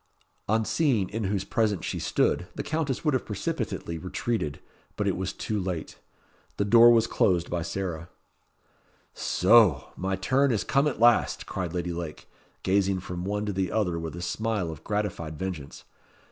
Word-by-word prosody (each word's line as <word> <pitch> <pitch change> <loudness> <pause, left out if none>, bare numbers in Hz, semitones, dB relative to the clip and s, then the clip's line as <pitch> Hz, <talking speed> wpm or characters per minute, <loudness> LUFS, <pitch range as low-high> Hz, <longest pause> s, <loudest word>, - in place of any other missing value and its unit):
On 110 +1 +2
seeing 125 - +1
in 110 0 -2
whose 95 0 0
presence 105 -2 0
she - - -3
stood, - - +1
the - - -3
Countess 155 -3 -2
would 150 - +3
have 130 - +1
precipitately 85 -4 -3
retreated; 90 -3 -2 0.4
but - - -1
it - - +1
was - - -2
too 105 -1 -3
late. 90 -4 -4 0.6
The 100 - +1
door 115 +3 +8
was 115 -1 +5
closed 90 -6 +1
by 85 -1 -1
Sarah. 85 -1 -4 1.0
"Soh! 95 - +4
my 95 +1 -1
turn 130 +8 +2
is 110 - 0
come 140 +2 +2
at 135 - -2
last," 120 0 +4
cried 90 -3 -4
Lady 90 0 -2
Lake, 85 -3 -6 0.4
gazing 95 0 +2
from 90 -1 -6
one 105 +1 -1
to 105 - -2
the 95 -1 -1
other 90 -6 0
with 80 -1 -5
a 85 - -6
smile 110 -5 -1
of 80 0 -10
gratified 95 -7 -3
vengeance. 85 -7 -6
95 Hz, 170 wpm, -27 LUFS, 85-110 Hz, 1.0 s, door